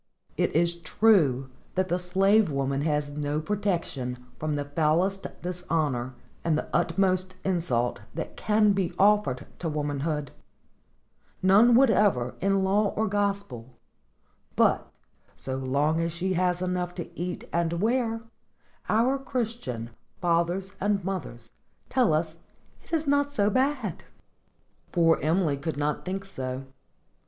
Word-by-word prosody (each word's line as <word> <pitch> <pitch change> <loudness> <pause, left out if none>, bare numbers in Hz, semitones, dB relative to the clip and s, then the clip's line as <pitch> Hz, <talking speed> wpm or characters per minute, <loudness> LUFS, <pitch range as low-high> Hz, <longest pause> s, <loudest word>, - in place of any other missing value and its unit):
It - - 0
is 170 +1 +1
true 155 - +3 0.2
that 185 0 0
the 175 - +1
slave 195 +3 +3
woman 140 -1 -1
has 150 -1 0
no 145 0 -2
protection 165 -9 -2 0.2
from 155 -1 -1
the 145 0 -2
foulest 165 +6 +1 0.2
dishonor 155 -8 -2 0.3
and 160 -2 +2
the - - -2
utmost 185 +1 +1
insult 165 - 0 0.2
that 160 - -5
can 210 -1 +3
be 195 -3 0
offered 200 -10 +3
to 165 - -2
womanhood,—none 150 - -1
whatever 210 - +4
in 195 0 +2
law 200 +2 +2
or 220 +1 +1
gospel; 200 - -2 0.8
but, - - +2 0.4
so 130 0 -4
long 140 +5 +1
as 165 0 -1
she 180 +3 -1
has 180 0 +1
enough 180 -1 -2
to 175 - -5
eat 180 +1 -4
and 170 -1 +1
wear, 225 +4 0 0.7
our 245 +5 +3
Christian 225 - -3 0.3
fathers 175 +3 0
and 200 -2 +1
mothers 130 -12 -5 0.4
tell 250 -7 +3
us 160 +1 0 0.5
it - - -19
is 320 -2 0
not 285 0 +2
so 205 -6 +2
bad! 255 - 0 0.9
Poor 165 -2 +4
Emily 160 -2 +1
could 150 +2 -4
not 145 0 -1
think 195 +1 -3
so. 130 -8 -5
175 Hz, 130 wpm, -27 LUFS, 150-200 Hz, 0.9 s, whatever